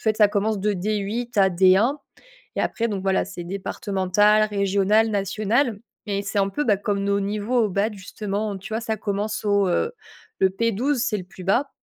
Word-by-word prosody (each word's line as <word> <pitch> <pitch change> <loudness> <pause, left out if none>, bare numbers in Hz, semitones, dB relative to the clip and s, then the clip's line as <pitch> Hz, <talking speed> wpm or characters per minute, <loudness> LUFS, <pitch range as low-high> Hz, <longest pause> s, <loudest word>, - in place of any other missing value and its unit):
fait 215 -1 +1
ça 210 -2 +5
commence 205 0 0
de 210 +2 +1
D8 215 +5 -3
à 195 -1 +5
D1 190 +9 +4 0.6
et - - 0
après 230 - -1
donc 200 -4 -3
voilà 190 -1 +1
c'est 185 -2 -7
départemental, 200 +2 +1
régional, 200 +2 +2
national 210 +4 0 0.3
et 200 -1 -1
c'est 200 +1 -1
un 195 0 +2
peu, 295 +10 -2
bah, 210 -8 +2
comme 200 0 -2
nos 200 0 +1
niveaux 210 +4 0
au - - -2
badminton 200 +3 0
justement 205 +1 -4
tu 195 +3 -8
vois 225 - -1
ça 220 -1 -2
commence 210 +1 -3
au, 200 -1 +3
heu, 180 - 0 0.5
le 190 - +4
P12 230 +7 0
c'est 230 -3 0
le 185 - -6
plus 185 0 -12
bas 240 +10 +1
205 Hz, 195 wpm, -23 LUFS, 195-220 Hz, 0.6 s, ça